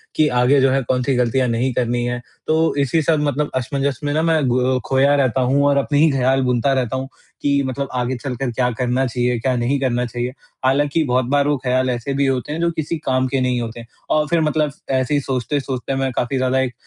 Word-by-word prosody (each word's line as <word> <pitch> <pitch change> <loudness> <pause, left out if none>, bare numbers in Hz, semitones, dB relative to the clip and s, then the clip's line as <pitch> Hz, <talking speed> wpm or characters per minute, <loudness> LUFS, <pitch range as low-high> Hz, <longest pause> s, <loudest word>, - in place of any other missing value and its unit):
कि 155 - +3
आगे 130 +3 +4
जो 135 - +4
है, 135 +1 +2
कौन-सी 130 +2 0
गलतियाँ 125 +1 +1
नहीं 120 +2 0
करनी 120 0 0
है, 120 0 -2 0.3
तो 160 0 +2
इसी 150 +4 +1
सब 155 0 +2
मतलब 145 +1 -1
असमंजस 135 +1 -1
में 145 0 -1
ना, 155 - +1
मैं 160 -4 +2
गो 125 +1 +1
खोया 135 +2 +3
रहता 130 -2 +1
हूँ 135 +3 +2
और 140 - +3
अपने 145 +1 +1
ही 160 - +5
ख़्याल 135 0 +2
बुनता 125 +2 +1
रहता 130 -2 -1
हूँ 130 0 -3 0.3
कि 140 -1 +2
मतलब 135 +1 -3
आगे 125 +1 -1
चल 125 0 -5
कर 130 0 -3
क्या 125 +1 0
करना 125 +3 0
चाहिए, 125 0 0
क्या 130 +2 0
नहीं 125 +4 0
करना 125 -2 0
चाहिए। 120 +1 -4 0.3
हालाँकि 145 +4 +2
बहुत 130 -2 +1
बार 145 0 +2
वो 145 - +2
ख़्याल 130 0 +1
ऐसे 125 +2 -2
भी 140 +1 +1
होते 135 +1 -1
हैं, 160 - -4
जो 170 - +2
किसी 160 0 -3
काम 130 -4 0
के 135 +1 -1
नहीं 125 -1 +1
होते 115 0 -6 0.3
और 150 0 +2
फिर 170 +1 +1
मतलब 150 -1 +1 0.2
ऐसे 130 +1 0
ही 145 - +3
सोचते-सोचते, 130 0 -2
मैं 135 -1 -1
काफ़ी 125 +2 -1
ज़्यादा 130 0 +1
एक 130 -2 -1
130 Hz, 230 wpm, -20 LUFS, 125-140 Hz, 0.3 s, ही